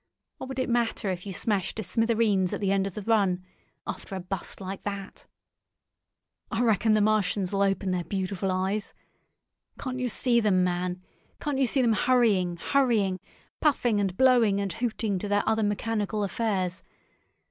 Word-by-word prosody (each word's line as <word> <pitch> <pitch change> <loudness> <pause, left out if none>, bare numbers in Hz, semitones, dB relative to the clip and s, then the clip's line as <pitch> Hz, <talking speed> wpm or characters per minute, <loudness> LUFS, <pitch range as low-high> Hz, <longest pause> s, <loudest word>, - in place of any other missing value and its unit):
What - - -6
would 265 0 -6
it 260 - 0
matter 235 -4 0
if 180 +2 -5
you - - -4
smashed 200 -1 -1
to 220 - -2
smithereens 215 -2 +1
at - - -2
the 195 -2 0
end 195 0 +2
of 195 - -8
the 210 - -5
run, 190 -5 +1 0.4
after 195 - -6
a - - -3
bust 185 +1 -5
like 195 0 -6
that? 200 -1 -6 1.2
I 225 - 0
reckon 220 -1 +3
the 215 - +3
Martians'll 200 -2 +1
open 195 -1 +1
their 180 -1 -1
beautiful 195 +1 -2
eyes! 190 +3 -2 0.8
Can't 255 -1 -4
you 250 -1 -1
see 235 +1 +2
them, 200 -5 +3
man? 180 0 -2 0.4
Can't 290 -2 -2
you 265 - +3
see 260 +2 +2
them 230 -2 +3
hurrying, 215 -8 +2
hurrying—puffing 235 - 0
and 190 -2 -1
blowing 240 -6 +4
and 200 -3 -2
hooting 220 -3 -1
to 205 - -4
their 205 0 +2
other 220 0 +2
mechanical 210 0 -1
affairs? 195 -3 -1
205 Hz, 165 wpm, -27 LUFS, 190-230 Hz, 1.2 s, blowing